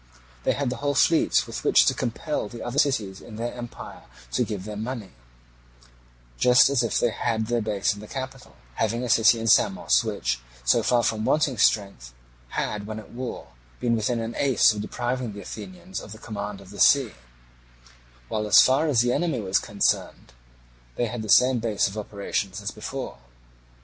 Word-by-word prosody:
They - - +3
had 140 -3 -2
the 125 - -4
whole 145 +2 -1
fleet 165 +5 +3
with - - -7
which - - +5
to - - +3
compel 105 - -3
the 115 +1 -8
other 120 +4 -2
cities 105 -9 0
in 110 - -11
their 120 +2 -4
empire 120 -1 -9 0.3
to 60 - +1
give 100 -3 -5
them 105 0 -6
money 115 -4 -5 1.3
just 125 +2 +6
as 135 -4 +2
if 115 -3 0
they 120 - +2
had 110 0 -1
their 120 +1 0
base 105 -1 0
in 105 - -11
the 105 - -10
capital, 130 0 -7 0.2
having 115 - -1
a 125 - -3
city 115 +1 +5
in 115 - -4
Samos 195 - +3
which, 60 - -2 0.3
so - - +4
far 120 -1 +2
from 110 -1 0
wanting 135 -1 +1
strength, 100 - +1 0.3
had 105 +11 -3
when 110 0 -5
at 110 - -10
war 125 +1 -6 0.3
been 120 -1 +1
within 115 +2 -1
an 115 +1 -4
ace 130 -5 +4
of 105 - -4
depriving 120 0 -3
the 100 - -8
Athenians 185 - -8
of 105 - -10
the - - -11
command 105 -2 -6
of 95 0 -14
the 100 - -10
sea, 135 -6 +5 1.2
while 105 - -2
as - - +7
far 135 +5 +4
as 130 -7 +3
the 120 0 +1
enemy 165 -7 0
was 95 -2 +1
concerned - - -1 0.6
they 120 - 0
had 120 0 -4
the 110 - -7
same 125 +3 +5
base 110 -3 +1
of 100 - -7
operations 100 -1 -3
as 100 - -4
before. - - -6
115 Hz, 190 wpm, -25 LUFS, 105-125 Hz, 1.3 s, as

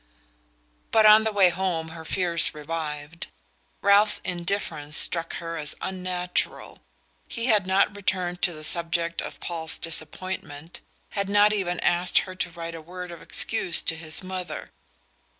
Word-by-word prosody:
But 220 -1 +4
on 215 +1 +9
the 220 - +1
way 195 -3 +5
home 175 -3 -2
her 160 0 -9
fears 170 -1 +1
revived. 150 +1 -5 0.6
Ralph's 205 +1 +7
indifference 170 -4 -1
struck 165 -1 +1
her 165 0 -5
as 150 -1 -2
unnatural. 180 -1 -3 0.5
He 230 - -4
had 210 -6 +3
not 195 +2 +2
returned 180 -3 -2
to 175 - +2
the 155 -1 -10
subject 170 +1 -1
of - - -8
Paul's 165 -2 -3
disappointment, 165 -1 -6 0.3
had 200 -1 -2
not 205 +1 +5
even 180 -4 -1
asked 175 +1 +2
her 185 - -8
to 185 -1 -3
write 170 -1 -7
a 165 - -8
word 180 +2 -8
of 170 - -10
excuse 190 -6 +2
to 165 - +1
his 160 +2 -2
mother. 185 -1 -6
175 Hz, 150 wpm, -25 LUFS, 165-190 Hz, 0.6 s, on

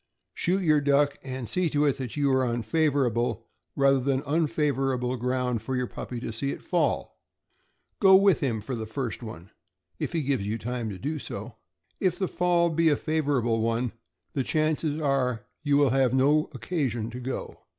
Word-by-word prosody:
Shoot 185 +2 0
your 155 -3 +4
duck, 145 0 +2
and 130 -3 -5
see 175 - 0
to 145 0 +2
it 140 -1 +1
that 130 +1 -5
you 140 -2 +2
are 130 0 +3
on 120 -1 -1
favorable 130 -3 +1 0.3
rather 135 -1 +4
than 135 +1 0
unfavorable 135 -4 0
ground 125 -1 -1
for 130 +4 -3
your 125 0 0
puppy 120 0 -6
to 115 - -4
see 140 +5 -2
it - - -5
fall. 165 -6 -1 0.8
Go 190 -1 +7
with 195 -4 +5
him 115 -6 -1
for 130 +5 -5
the 110 -2 -4
first 125 +1 -4
one, 100 -6 -9 0.5
if - - -3
he 165 -3 0
gives 135 -6 0
you 110 +2 -1
time 120 0 -3
to 100 - -6
do 150 +8 -3
so. 110 -1 -7 0.4
If 185 -3 +1
the 190 - 0
fall 175 -1 +2
be 165 +1 +3
a 145 - +4
favorable 140 -8 0
one, 115 +1 0 0.4
the 140 - 0
chances 155 +1 0
are 130 -6 0 0.2
you 145 -2 +2
will 145 -4 +4
have 130 -1 +3
no 145 +4 +3
occasion 130 -6 -2
to 125 - -6
go. 130 +1 -6
135 Hz, 185 wpm, -27 LUFS, 120-150 Hz, 0.8 s, Go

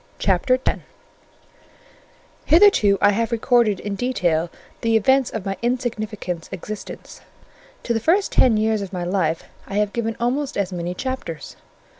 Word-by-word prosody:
CHAPTER 200 +7 +2
X - - +1 1.7
Hitherto 315 - +5
I 205 - +5
have 230 +3 -1
recorded 230 -3 +2
in 205 - -4
detail 180 -8 0 0.3
the 225 -1 +3
events 265 +4 +3
of 220 -3 -5
my 195 0 -3
insignificant 220 -8 -3
existence: 200 +3 -8 0.6
to 235 - -1
the 225 - 0
first 365 - +2
ten 235 -4 +4
years 215 0 +1
of 195 -2 -6
my 180 -2 -4
life 175 -3 0 0.2
I 195 - -6
have 210 0 +1
given 225 -1 -2
almost 260 +4 -1
as 195 -2 -1
many 175 0 -4
chapters. 260 - -5
215 Hz, 145 wpm, -22 LUFS, 190-245 Hz, 1.7 s, Hitherto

